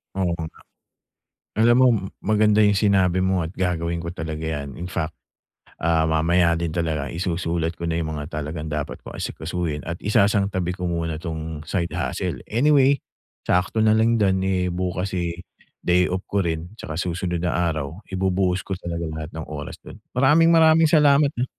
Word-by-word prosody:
Oo 95 -2 0
nga. 80 -1 -7 1.0
Alam 115 +2 +5
mo 130 - +7 0.3
maganda 105 0 +3
'yung 105 -1 +5
sinabi 95 -3 +3
mo 95 0 +1
at 80 - -8
gagawin 85 -2 -1
ko 85 - -4
talaga 80 -3 -5
'yan, 75 -4 -4
in 90 +2 -6
fact, 80 0 -3 0.7
ah, 80 -1 +2
mamaya 85 +2 +3
din 85 0 -2
talaga 80 -4 -2
isusulat 85 -1 -1
ko 85 - -6
na 85 0 -1
'yung 80 -1 -3
mga 75 +2 -7
talagang 75 +1 -5
dapat 75 -1 -4
kong - - -9
asikasuhin 80 -2 -3
at 85 0 -5
isasang 100 0 +3
tabi 90 -3 -2
ko 90 -1 -4
muna 85 -2 -2
'tong 80 -2 -5
side 85 -3 -1
hustle. - - -2
Anyway, 140 +2 +3 0.4
sakto 90 +5 +1
na 110 - +5
lang 115 +1 +3
dun, 95 -3 +2
eh, 90 -1 0
bukas, 90 +1 -2
eh, 85 0 -3 0.4
day 90 +1 +3
off 95 +1 -2
ko 100 - +1
rin 85 -1 -2
tsaka 80 - -6
susunod 90 +1 -2
na 90 - +1
araw 80 -2 -2
ibubuhos 95 -1 0
ko 95 -2 -5
talaga 85 -1 -4
lahat 80 0 -6
ng 80 0 -5
oras 75 -1 -6
dun. - - -11 0.2
Maraming-maraming 160 +4 +5
salamat, 150 -2 +5
ha. 120 - +1
90 Hz, 170 wpm, -23 LUFS, 80-100 Hz, 1.0 s, mo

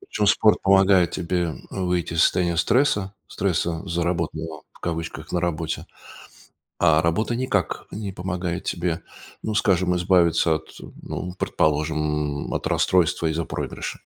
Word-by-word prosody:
Причем 390 - -2
спорт 105 +1 +4
помогает 95 -2 +5
тебе 85 -2 -1 0.2
выйти 90 -3 -1
из 80 - +4
состояния 85 -2 +2
стресса, 100 - +2
стресса 85 -3 -1
заработанного 85 -2 -2
в - - -21
кавычках 80 -1 -4
"на 90 - +1
работе". 80 -2 -2 0.9
А 80 -2 +5
работа 95 +9 0
никак 120 -8 -1
не 100 -2 -5
помогает 90 -1 -3
тебе, 85 -1 -1 0.4
ну 110 - -2
скажем, 90 -3 +2
избавиться 85 -2 +3
от, 80 - -7 0.3
ну 90 0 -5
предположим, 75 -1 0
м, - - -4
от - - -1
расстройства 85 -2 +2
из-за 80 +1 -1
проигрыша. - - -5
85 Hz, 130 wpm, -24 LUFS, 80-95 Hz, 0.9 s, помогает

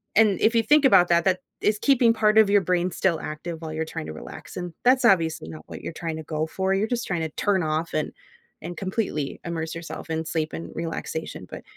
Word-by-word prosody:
and 215 -3 +4
if 230 +2 +4
you 230 - +4
think 295 +3 +5
about 180 -9 +6
that, 170 0 +3
that 185 -1 +2 0.2
is 210 0 +2
keeping 245 -4 +4
part 215 -1 +3
of 220 -2 +7
your 200 0 +5
brain 180 0 0
still 170 -3 +1
active 160 +2 -6
while 160 -1 -5
you're 160 +1 -2
tryna 80 - -6
relax, 80 - -10
and 175 -1 -5
that's 255 0 +4
obviously 165 - +3
not 80 -1 -9
what - - -8
you're 165 - -6
tryna 160 -2 -5
go 155 0 -1
for, 190 +3 -1
you're 200 +3 +1
just 240 0 -2
tryna 165 -4 -1
turn 195 -2 +2
off 155 +1 -1
and 155 - -1 0.5
and 175 +1 -7
completely 190 -7 -2
immerse 165 -1 -3
yourself 165 0 -7
in 160 0 -1
sleep 155 0 -2
and 165 - -6
relaxation 160 - -4
but, - - -8
175 Hz, 220 wpm, -25 LUFS, 160-205 Hz, 0.5 s, of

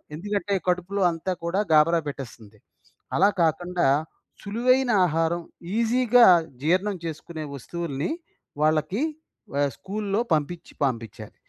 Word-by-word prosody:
ఎందుకంటే, 200 +3 -2
కడుపులో 180 +2 0
అంతా 165 +3 -4
కూడా 170 +3 0
గాబరా 160 +2 +5
పెట్టేస్తుంది. 115 -6 -8 0.6
అలా 195 - +5
కాకండా 175 0 +1 0.5
సులువైన 245 +5 +2
ఆహారం, 165 +1 0 0.4
ఈజీగా 240 +1 +5 0.4
జీర్ణం 185 +6 +1
చేసుకునే 160 0 -6
వస్తువుల్ని, 155 - -4 0.5
వాళ్ళకి 155 - +1 0.5
వ - - -5 0.2
స్కూల్‌లో 205 +1 -3
పంపించి 160 +3 -2
పంపించాలి. 115 -5 -5
170 Hz, 100 wpm, -25 LUFS, 155-200 Hz, 0.6 s, గాబరా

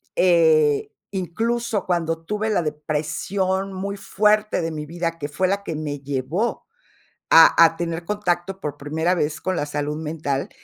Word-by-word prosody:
eh, 160 -5 +4 0.2
incluso 225 +4 -2
cuando 165 -2 -1
tuve 210 +4 -2
la 200 -5 +2
depresión 165 +6 -2
muy 200 +2 -4
fuerte 210 0 +1
de 165 0 -2
mi 150 -1 -5
vida, 170 +1 -3
que 145 - -3
fue 185 +5 0
la 200 0 -1
que 165 - -3
me 150 -2 -4
llevó 140 - -2 0.7
a - - +8
a 165 - +2
tener 170 0 -3
contacto 190 -2 -2
por 145 -1 -4
primera 160 +5 0
vez 150 -1 -2
con 185 -1 -1
la 145 - -1
salud 145 +1 -3
mental. 150 -3 -3
170 Hz, 160 wpm, -22 LUFS, 150-195 Hz, 0.7 s, a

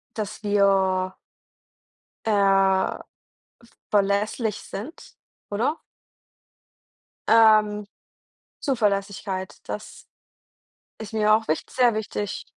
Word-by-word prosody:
Dass 215 -2 -5
wir 195 -2 +2 1.1
äh, - - +1
v 195 -2 +2 0.9
verlässlich 205 +2 +1
sind, 275 - -9 0.3
oder? 235 +10 0 1.5
Ähm, 215 -2 +5 0.8
Zuverlässigkeit, 200 -5 -1 0.2
das - - -7 0.9
ist 220 0 -8
mir 215 -1 +3
auch 220 +1 0
wicht 155 - -2
sehr 245 -3 +3
wichtig. 210 -2 -4
205 Hz, 75 wpm, -24 LUFS, 195-220 Hz, 1.5 s, Ähm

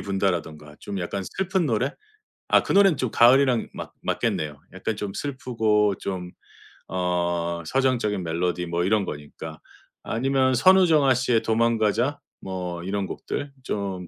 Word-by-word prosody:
분다라든가. 80 -6 -2
좀 100 -1 -5
약간 95 +2 -3
슬픈 185 - -1
노래? 125 +3 0 0.6
아, - - +5
그 - - -2
노래는 195 -5 +5
좀 130 -3 -2
가을이랑 125 0 +4
맞 - - -8
맞겠네요. 75 -2 -1
약간 95 +4 -3
좀 100 -2 -4
슬프고 110 -6 0
좀 90 -2 -5 0.6
어 85 -1 -1
서정적인 120 -7 +1
멜로디 90 +2 -1
뭐 85 +1 -1
이런 105 +1 +2
거니까. 75 +1 -8 0.4
아니면 130 +2 +1
선우정아 160 -3 +5
씨의 125 -2 +1
도망가자, 115 +4 +1 0.2
뭐 90 -2 -5
이런 100 +2 -2
곡들 140 +8 -5
좀 95 -6 -4
105 Hz, 285 characters per minute, -24 LUFS, 90-130 Hz, 0.6 s, 아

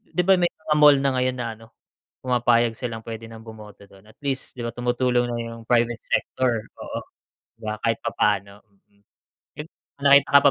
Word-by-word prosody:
'di 180 - +2
ba 190 0 +5
may 175 - +3
mga 155 -1 -2
mall 150 -1 +8
na 140 -1 +2
ngayon 130 0 0
na 120 -1 -3
ano, 115 - -14 0.6
pumapayag 120 -2 +2
silang 115 -3 -4
puwede 115 -1 -7
nang 110 0 -11
bumoto 105 -2 -12
do'n. 95 +1 -19
At - - -31
least 135 -2 -3
'di - - -5
ba 115 - -3
tumutulong 120 0 +1
na 120 - -3
'yung 115 0 -8
private 120 0 +1
sector, 120 -4 0
oo, - - -6 0.6
'di 115 - -20
ba 105 - -3
kahit 115 0 +1
papaano, 100 0 -1
mm. 100 0 -35 0.6
Eh, 150 - -6 0.3
may 140 - -7
nakita 140 - -12
ka - - -6
120 Hz, 195 wpm, -23 LUFS, 110-130 Hz, 0.6 s, mall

